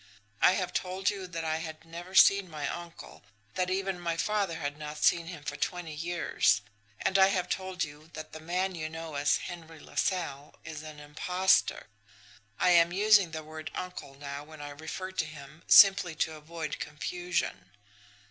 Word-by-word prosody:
"I 180 - +7
have 185 -2 -2
told 185 +2 0
you 195 -2 -6
that 165 -2 -5
I 160 0 0
had 160 -1 -7
never 175 +3 -9
seen 195 -1 +6
my 150 -3 -4
uncle, 175 -1 -8 0.3
that 185 0 0
even 190 -1 -1
my 170 -1 -2
father 200 -2 0
had 145 -2 -3
not 150 0 -6
seen 170 -1 +4
him 175 -4 -8
for - - -4
twenty 175 -3 -3
years; 160 -10 +1 0.4
and 195 - +2
I 190 - +8
have 185 -2 0
told 190 -1 -2
you 150 +1 -9
that 155 0 -8
the 160 - -7
man 180 +4 -1
you 155 -2 -4
know 160 0 -7
as 145 +1 +2
Henry 165 -3 -9
LaSalle 145 -5 -2
is 155 -1 -6
an 155 -1 -10
impostor 180 +6 +2 0.7
I 180 - +4
am 170 -1 +6
using 200 -1 +5
the 160 -1 -6
word 155 0 -7
'uncle' 180 -6 -6
now 140 0 -6
when 155 0 -13
I 145 0 -6
refer 160 +6 -6
to 175 -4 -1
him 155 0 -12
simply 195 -4 +7
to 160 0 0
avoid 155 0 -6
confusion. 170 - -3
165 Hz, 175 wpm, -30 LUFS, 155-180 Hz, 0.7 s, I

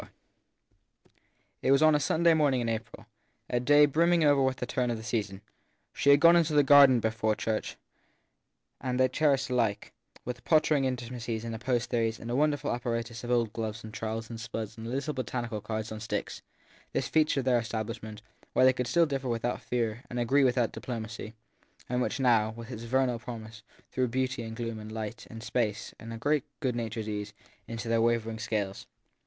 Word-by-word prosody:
IV - - -14 1.5
IT - - 0
was 140 +3 +5
on 155 0 +6
a 150 - +3
Sunday 165 +4 +3
morning 145 -5 +3
in 120 - -1
April, 110 0 -5 0.5
a 120 - +2
day 145 +4 +6
brimming 165 +3 +3
over 145 -2 +4
with 130 -1 +2
the - - -3
turn 125 0 -1
of 120 - -1
the 110 - -8
season. 105 -3 -3 0.5
She 140 - +1
had 140 0 +7
gone 170 +3 +7
into 165 -2 +3
the 145 -1 +5
garden 140 -2 +7
before 110 -1 0
church; 110 0 -3 1.1
they 130 0 +2
cherished 140 -4 +1
alike, 115 -5 0 0.3
with 125 0 -5
pottering 155 -3 +3
intimacies 120 -3 -3
and 115 - -4
opposed 120 +1 -1
theories 115 -2 0
and 115 - -6
a - - 0
wonderful 145 0 +1
apparatus 115 -1 -3
of 120 - -6
old 120 -3 +1
gloves 110 0 -4
and 110 -1 -9
trowels 110 +1 -4
and 115 -1 -7
spuds 110 0 -5
and 115 0 -7
little 140 +4 -2
botanical 120 -4 -3
cards 110 +1 -4
on 110 - -5
sticks, 115 +1 -4 0.5
this - - 0
feature 155 -3 +2
of - - -9
their 125 -2 +4
establishment, 110 -2 -5 0.3
where - - +5
they 130 - +6
could 125 -1 -2
still 165 +7 +4
differ 135 -4 -3
without 120 +1 -2
fear 115 0 -2
and 125 - -5
agree 135 +4 +3
without 125 -3 +2
diplomacy, 115 -2 -6 0.5
and 125 0 0
which 125 - -1
now, 115 -5 +3
with 115 +1 -8
its 115 -2 -6
vernal 125 -1 +1
promise, 115 -2 -8 0.3
threw 130 -1 0
beauty 130 +1 -1
and 115 -1 -6
gloom 115 -1 -4
and 110 0 -8
light 110 +1 -6
and 115 0 -9
space, 110 -4 -2
a 115 0 -7
great 145 +4 +1 0.2
good 125 -3 -1
natured 115 -2 -3
ease, 105 -1 -4 0.3
into 115 0 -5
their 115 0 +2
wavering 115 -1 0
scales. 105 -4 -3
120 Hz, 190 wpm, -29 LUFS, 110-130 Hz, 1.5 s, had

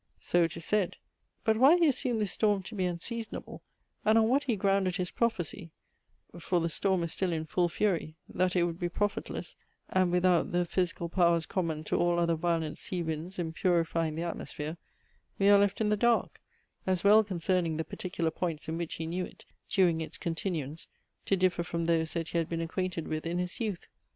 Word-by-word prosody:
"So 175 - +2
it 165 +1 -5
is 165 - -3
said." 210 -4 +1 0.5
But 220 -1 +3
why 275 +8 +7
he 340 -2 +4
assumed 250 -4 0
this 205 - 0
storm 205 -3 +1
to 205 - -9
be 190 -3 -1
unseasonable, 220 +6 -5 0.4
and 215 +1 +4
on 220 -1 +5
what 275 +3 +2
he 240 - +1
grounded 195 -2 +1
his 180 -1 -2
prophecy, 190 -6 -1 0.7
(for 175 +1 +1
the 165 0 0
storm 190 +2 0
is 170 - -3
still 190 -2 -1
in 160 -1 -2
full 175 +2 +1
fury), 170 -4 0
that 185 0 0
it 175 - +4
would 170 0 -2
be 175 -2 -1
profitless, 205 +3 -3 0.3
and 185 -2 +2
without 180 -1 +3
the 175 0 +2
physical 175 -1 -1
powers 170 -2 +3
common 165 -4 -2
to - - -1
all 175 0 +2
other 170 -1 +2
violent 165 -1 -1
sea 180 -2 -3
winds 160 +4 -4
in 165 -2 -3
purifying 165 -3 +1
the 165 - -2
atmosphere, 160 -2 -4 0.6
we 200 0 +4
are 205 0 +8
left 200 0 +2
in 215 -1 +1
the 210 - +3
dark; 235 +2 +1 0.5
as 185 -2 +1
well 210 +2 +7
concerning 180 -4 0
the 160 - -1
particular 170 -3 -3
points 160 -2 -3
in 160 +1 -3
which 170 -2 -3
he 160 - -4
knew 175 +3 -2
it, - - -15 0.2
during 175 -5 +3
its 160 - -6
continuance, 165 -3 -3 0.4
to 195 - +3
differ 185 -1 +2
from 170 0 -2
those 165 -1 +1
that 165 -2 -2
he 170 - 0
had 165 - -2
been 165 - -2
acquainted 170 0 -3
with 155 0 -3
in 170 +1 -1
his 180 0 -3
youth. 210 -6 -3
175 Hz, 205 wpm, -30 LUFS, 165-195 Hz, 0.7 s, are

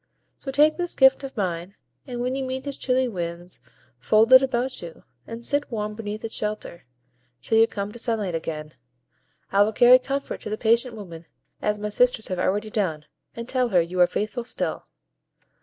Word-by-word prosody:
So 275 - -6
take 300 +3 +4
this 350 -1 -2
gift 265 0 +5
of 270 -3 -8
mine, 180 -1 -3 0.3
and 245 -2 -4
when 250 +1 -1
you 270 0 -2
meet 260 +1 -4
his 280 -1 -4
chilly 255 0 +1
winds, 175 - -6 0.4
fold 220 - +4
it 260 - +11
about 260 -1 -1
you, 170 -1 -10 0.2
and 230 +1 -7
sit 290 0 0
warm 210 -2 -3
beneath 210 0 -6
its 225 - -5
shelter, 210 -5 -4 0.6
till 225 - +2
you 225 - +6
come 200 -1 -5
to 235 - -10
sunlight 220 -6 -1
again. 155 -2 -4 0.8
I 200 - +4
will 215 +2 +3
carry 245 +3 +7
comfort 275 +2 -4
to - - -6
the 215 - -3
patient 235 +2 +2
woman, 170 -6 -10 0.3
as 210 0 0
my 210 0 -4
sisters 245 +1 +2
have 185 -1 -2
already 210 +4 0
done, 165 -9 -1 0.3
and 235 0 -6
tell 255 -1 0
her 185 -5 +4
you 175 +2 -2
are 180 - +7
faithful 215 +6 -3
still." 240 - -4
220 Hz, 190 wpm, -24 LUFS, 190-255 Hz, 0.8 s, it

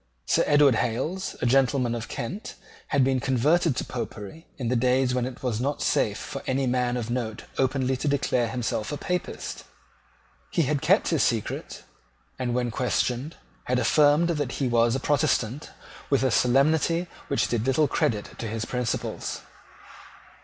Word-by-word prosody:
Sir - - +3
Edward 145 -2 +5
Hales, 135 +12 -2
a - - +2
gentleman 125 -1 +2
of 115 -1 -4
Kent, 185 - -5 0.3
had 140 -3 +2
been 130 0 +2
converted 140 +5 +2
to - - -2
Popery 115 - -7
in 125 -4 -3
days 125 +1 +2
when 125 -1 0
it 130 0 -9
was 120 -3 -1
not 140 +3 -1
safe 105 -1 +1
for 135 +4 -6
any 135 +1 +1
man 125 -1 0
of 120 -1 -4
note 115 -3 -3 0.2
openly 130 0 +1
to 150 - -3
declare 135 -4 +1
himself 115 -1 -2
a 145 - -3
Papist. 180 +5 -4 0.9
He 170 - +1
had 145 0 0
kept 185 +7 +3
his 165 -4 +2
secret, 115 -4 -2 0.6
and, 120 -2 -1
when 120 -1 0
questioned, 125 +4 -1 0.3
had 125 - +1
affirmed 150 +5 +4
that 145 -6 -1
he 135 - -1
was 120 0 +3
a - - 0
Protestant 135 -2 0 0.4
with 140 -2 +2
a 130 - +2
solemnity 155 +8 +3 0.2
which 140 - +1
did 120 0 -1
little 145 +3 +3
credit 105 -5 -1
to 115 - -3
his 110 +1 -3
principles. 125 -1 -3
130 Hz, 160 wpm, -26 LUFS, 120-145 Hz, 0.9 s, Edward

